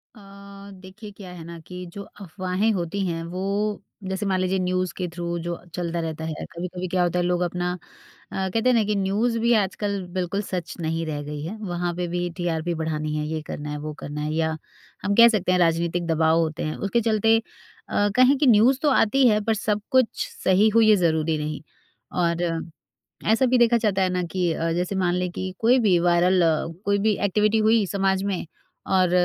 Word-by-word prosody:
अ, - - -15 0.6
देखिए 200 +3 -11
क्या 195 -2 -11
है 175 -2 -9
ना 170 +1 -9
कि 180 0 -7
जो 200 - -7 0.2
अफ़वाहें 185 +3 -1
होती 180 0 -3
हैं 165 -1 -3
वो 180 - -5 0.7
जैसे 190 +2 -2
मान 190 -2 +1
लीजिए 185 +1 0
न्यूज़ 185 -1 -1
के 180 - -2
थ्रू 170 0 -3
जो 170 0 -3 0.2
चलता 170 -1 -2
रहता 160 -1 -4
है 160 - -3 0.2
कभी-कभी 180 +1 -5
क्या 180 0 +1
होता 175 0 0
है 175 - +1
लोग 180 0 0
अपना 180 0 -1 0.6
अ, - - -7
कहते 225 +6 +1
हैं - - +4
ना 225 - +3
कि 210 0 -1
न्यूज़ 205 +5 0
भी 235 +1 +3
आजकल 200 +1 -3 0.2
बिल्कुल 185 +2 -1
सच 180 -4 -5
नहीं 165 0 -2
रह 150 -2 -3
गई 150 0 -6
है। 185 +8 -5
वहाँ 175 -3 -2
पे 175 0 -2
भी 175 +1 -2
टीआरपी 170 -1 -1
बढ़ानी 155 -2 -3
है 150 - -2
ये 160 0 -3
करना 150 0 -5
है, 150 - -4
वो 150 +1 -5
करना 145 +1 -5
है 150 +1 -2
या 160 0 0 0.5
हम 200 - +1
कह 235 +2 +9
सकते 205 -5 +1
हैं 180 - +3
राजनीतिक 170 0 +1
दबाव 160 0 +3
होते 160 -2 -1
हैं। 155 - -3
उसके 200 +4 0
चलते 225 0 +3 0.5
अ, 205 0 +2
कहीं 255 +3 +5
की 285 0 +2
न्यूज़ 240 +3 +5
तो 300 - +3
आती 265 0 +4
है, 210 -2 +4
पर 225 +2 +1
सब 210 0 -1
कुछ 260 -3 +2 0.2
सही 195 +4 +4
हुई 225 -1 +6
है, 215 - +7
ज़रूरी 160 -3 +1
नहीं। 150 -1 -4 0.5
और 170 -1 0 0.9
ऐसा 260 +4 +3
भी 250 0 +3
देखा 235 0 +5
जाता 195 -2 +1
है 185 - +2
ना 180 0 0
कि 180 -3 +1
अ, 165 +1 -1
जैसे 180 +3 -2
मान 175 0 +1
लें 180 0 -1
कि 185 +1 -4
कोई 240 +3 +4
भी 180 -3 +5
वायरल 180 +1 +3 0.4
कोई 200 0 +2
भी 215 - +3
एक्टिविटी 210 +3 +2
हुई 225 -1 +4
समाज 190 0 0
में 195 -3 -2 0.5
और 185 -2 +3
180 Hz, 210 wpm, -24 LUFS, 170-205 Hz, 0.9 s, कह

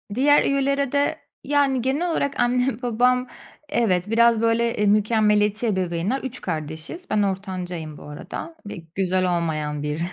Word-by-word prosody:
Diğer 290 +4 +5
üyelere 275 -1 +1
de 285 0 -1 0.2
Yani 280 -2 +2
genel 285 +8 0
olarak 280 -3 -1
annem 250 0 +1
babam 250 +1 +2 0.4
evet 205 -5 +1
biraz, 230 0 +4
böyle, 230 +1 +1
eee, 210 - +1
mükemmeliyetçi 210 +1 +2
ebeveynler. 190 +4 -1
3 255 -1 -5
kardeşiz. 160 - -5
Ben 210 - +2
ortancayım 180 -5 -4
bu - - -12
arada 150 - -8
ve - - -6 0.2
güzel 185 -2 +1
olmayan 155 -3 -2
bir 150 +1 -3
220 Hz, 140 wpm, -23 LUFS, 180-260 Hz, 0.4 s, Diğer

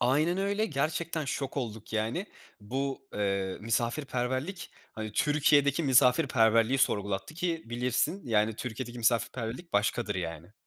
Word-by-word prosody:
Aynen 150 +9 +2
öyle. 200 +2 +1
Gerçekten 155 +1 -1
şok 135 0 -3
olduk, 110 -5 -5
yani. 110 - -1 0.3
Bu, 135 +5 -3
eee, 100 -2 -1
misafirperverlik, 130 - -2 0.2
hani, 110 -1 -5
Türkiye'deki 145 +1 +3
misafirperverliği 125 -3 +4
sorgulattı 100 +1 0
ki 170 -1 -2
bilirsin, 125 +10 0
yani, 110 -2 +1
Türkiye'deki 120 0 -5
misafirperverlik 120 +6 -1
başkadır, 105 +1 +1
yani. 85 0 -5
125 Hz, 115 wpm, -29 LUFS, 110-150 Hz, 0.3 s, misafirperverliği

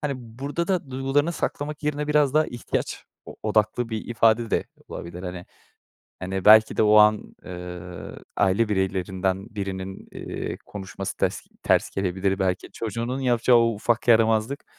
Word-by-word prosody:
Hani, 145 -1 -1
burada 135 +8 -4
da 175 -8 -1
duygularını 135 +5 +1
saklamak 150 -2 -4
yerine 150 0 -1
biraz 150 -2 +2
daha 155 0 +4
ihtiyaç 120 - -4 0.2
o - - -10
odaklı 110 +2 +1
bir 110 -2 -4
ifade 115 0 +3
de - - +1 0.2
olabilir, 85 +1 -7
hani. 90 -1 -6 0.7
Hani, 95 0 -3
belki 110 +1 +7
de, - - +3
o 105 0 +5
an, 105 0 +4
ııı, 90 -1 -8 0.2
aile 100 +3 +2
bireylerinden 95 -1 -1
birinin, 95 -1 -5
eee, - - -5
konuşması 95 -1 -6
tes - - -1 0.2
ters - - +2
gelebilir. 95 0 -1
Belki, 95 -1 -1
çocuğunun 115 +4 -3
yapacağı 120 -1 +4
o 115 -1 +3
ufak 120 +3 -1
yaramazlık, 115 +3 +3
110 Hz, 145 wpm, -24 LUFS, 95-125 Hz, 0.7 s, belki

